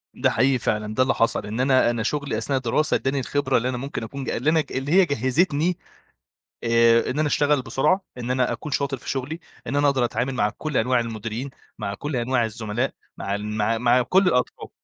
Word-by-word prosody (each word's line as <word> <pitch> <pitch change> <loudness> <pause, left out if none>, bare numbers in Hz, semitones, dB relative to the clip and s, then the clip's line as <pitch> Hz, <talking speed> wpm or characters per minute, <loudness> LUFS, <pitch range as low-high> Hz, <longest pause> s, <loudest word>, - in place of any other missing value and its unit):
ده - - +2
حقيقي 130 +2 +2
فعلًا، 105 0 -1
ده 130 +4 +3
اللي 130 - +1
حصل 115 - +1
إن 110 +4 -4
أنا 130 -2 +4
أنا 115 -2 -1
شُغلي 145 -2 -2
أثناء 135 +5 -1
الدراسة 130 +5 +1
ادّاني 135 +1 0
الخبرة 135 0 0
اللي 125 +2 0
أنا 125 - -3
مُمكن 135 -2 -5
أكون 140 +5 -6
ج - - -4
اللي 140 +6 0
أنا 160 -1 +3
اللي 135 +3 -3
هي 190 +1 +6
جَهّزتني 150 +5 +1 0.9
آآ 115 0 +4
إن 140 - -2
أنا 155 - +2
اشتغل 145 -1 +2
بسرعة، 150 +9 +1 0.2
إن 125 +1 -3
أنا 125 -1 +1
أكون 120 +6 -5
شاطر 140 0 -1
في - - -9
شُغلي، 140 +5 -3 0.3
إن 135 - -2
أنا 145 0 +3
أقدر 130 -3 +1
أتعامل 125 +2 -2
مع 105 -4 +2
كلّ 155 -3 -2
أنواع 125 +2 +2
المديرين، 115 +3 -4 0.3
مع 100 - -3
كلّ 145 +7 -4
أنواع 120 -1 +1
الزملاء 110 +3 -3 0.2
مع 100 +1 -2
ن 105 +1 -4
مع 110 +2 +1
مع 125 +2 +3
كلّ 180 +10 +3
الأطراف. 125 -7 0
130 Hz, 215 wpm, -23 LUFS, 115-145 Hz, 0.9 s, هي